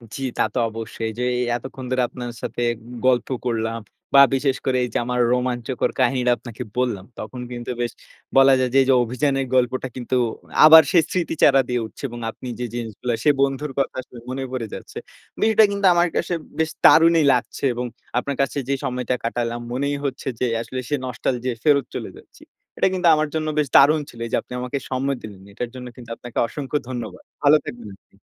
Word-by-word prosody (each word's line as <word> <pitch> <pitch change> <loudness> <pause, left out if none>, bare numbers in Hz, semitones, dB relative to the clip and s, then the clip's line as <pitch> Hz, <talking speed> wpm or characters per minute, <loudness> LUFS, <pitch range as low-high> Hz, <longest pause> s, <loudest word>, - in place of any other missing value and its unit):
জি, 135 - -6 0.2
তা - - +2
তো - - -4
অবশ্যই। 115 +1 -7
এই - - -7
যে 125 - 0 0.3
এতক্ষণ 130 +1 -7
ধরে 130 0 +2
আপনার 120 -1 -6
সাথে - - -4 0.4
গল্প 125 -2 +3 0.2
করলাম, 115 -1 -1 0.3
বা 140 - +9
বিশেষ 135 0 +1
করে 130 -1 +1
এই 125 - -2
যে - - +1
আমার 125 0 -1
রোমাঞ্চকর 125 0 -1
কাহিনীটা 125 -1 +2
আপনাকে 115 -1 -8
বললাম। 120 -7 -1
তখন 110 +4 -7
কিন্তু 120 0 -5
বেশ 120 - -1 0.5
বলা 135 0 +7
যায়, 130 - +1
যে - - +4
এই 130 - +2
যে, - - +6
অভিযানের 135 +3 0
গল্পটা 130 +1 +1
কিন্তু 130 0 -3 0.5
আবার 160 +1 +11
সেই 170 -3 +5
স্মৃতি 175 -2 -1
চারা 135 -1 +6
দিয়ে 125 -1 0
উঠছে, 110 - -13
এবং 120 - -8
আপনি 125 - -10
যে 125 - -2
জিনিসগুলা 120 +1 -3
সে - - +4
বন্ধুর 140 +1 0
কথা 135 - 0
আসলে 125 -1 -13
মনে 130 +1 -3
পড়ে 125 -3 -3
যাচ্ছে। - - -9 0.4
বিষয়টা 220 0 +5
কিন্তু 200 -1 -1
আমার 175 0 +3
কাছে 175 - 0 0.2
বেশ 160 - +2 0.2
দারুণই 165 0 +7
লাগছে, 125 - -3
এবং 125 +1 -3 0.3
আপনার 140 +2 -1
কাছে 135 +1 -1
যে 140 - +2
সময়টা 125 0 -1
কাটালাম, 120 0 -2
মনেই 140 +3 -1
হচ্ছে 135 -1 -4
যে 125 - +1 0.2
আসলে 130 +2 -5
সে 145 - +2
নস্টালজিয়া 125 0 -2
য় - - -21
ফেরত 140 -4 +4
চলে - - -4
যাচ্ছি। - - -18 0.4
এটা - - +3
কিন্তু 180 -2 +1
আমার 155 0 0
জন্য 155 0 -1
বেশ 150 - +1
দারুণ 150 +3 +6
ছিল, 120 - -14
এই - - -6
যে - - +4
আপনি - - -12
আমাকে 125 +3 -3
সময় 135 +1 -1
দিলেন। 100 -3 -10
এটার 120 +4 -4
জন্য 125 -1 -7
কিন্তু 120 -3 -12
আপনাকে 120 0 -10
অসংখ্য 145 +2 -3
ধন্যবাদ। 115 -7 -6 0.2
ভালো 145 +1 +7
থাকবেন 120 -3 -8
আপনি। - - -31
130 Hz, 200 wpm, -22 LUFS, 120-140 Hz, 0.5 s, আবার